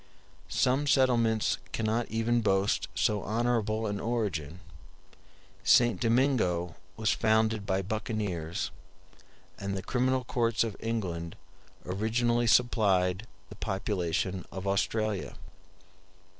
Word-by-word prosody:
Some 135 +3 +1
settlements 120 -5 +3
cannot 115 +1 -1
even 115 +1 +1
boast 100 -1 +1
so 105 -2 +1
honorable 110 0 0
an 100 -1 -2
origin; 95 -9 -2 1.0
St. 120 -6 +4
Domingo 115 - +1 0.2
was 110 -1 +1
founded 110 -1 +1
by 95 +1 0
buccaneers; 100 -5 -3 0.9
and 100 0 -3
the 95 - -5
criminal 130 0 +1
courts 115 -2 +1
of 110 -3 -4
England 90 -8 -3 0.5
originally 120 +5 +1
supplied 100 -5 +3 0.2
the 105 - -10
population 95 -2 -2
of 95 0 -6
Australia. 105 +1 -1
110 Hz, 100 wpm, -29 LUFS, 95-115 Hz, 1.0 s, St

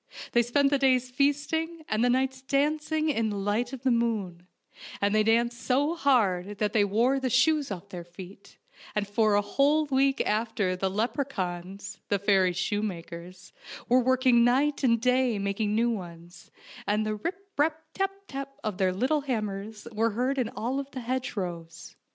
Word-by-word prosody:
They 240 - +4
spent 275 +4 +2
the 280 - +2
days 255 -2 +2
feasting 300 +4 0
and 215 +2 0
the 245 - +3
nights 260 +1 0
dancing 300 +3 0
in 225 -6 0
the 205 - -3
light 210 +5 -1
of 265 -2 -8
the 260 - +3
moon, 210 -7 -1 0.5
and 200 +1 +1
they 215 - +4
danced 235 +2 +1
so 285 +5 +1
hard 205 - +1
that 210 0 -1
they 215 - +4
wore 235 +7 +2
the 260 -1 -1
shoes 285 +4 +3
off 195 0 -7
their 180 -3 -7
feet, 180 +3 -13 0.4
and 205 -1 0
for 210 0 +2
a 205 - +3
whole 285 +8 +2
week 270 -1 +2
after 210 -4 0
the 190 +1 -1
leprechauns, 200 -4 -3
the 200 - +2
fairies' 190 -3 +2
shoemakers, 180 -2 -4 0.4
were 250 +2 +5
working 255 -1 +4
night 275 +5 +2
and 230 -3 +4
day 250 -1 +2
mak 200 +1 -3
ing 210 -1 0
new 235 +2 +2
ones, 175 -4 -8 0.4
and 210 +1 +1
the 215 - -1
rip, 390 - -6
rap, 315 +2 +1
tap, 390 0 0 0.2
tap 275 0 -6
of 215 -3 -3
their 185 -1 +2
little 260 +10 +1
hammers 215 -4 -4
were 225 +1 +1
heard 260 +2 0
in 240 -3 0
all 255 +5 -2
the 270 -1 -8
hedgerows. 180 -9 -5
230 Hz, 175 wpm, -27 LUFS, 200-270 Hz, 0.5 s, were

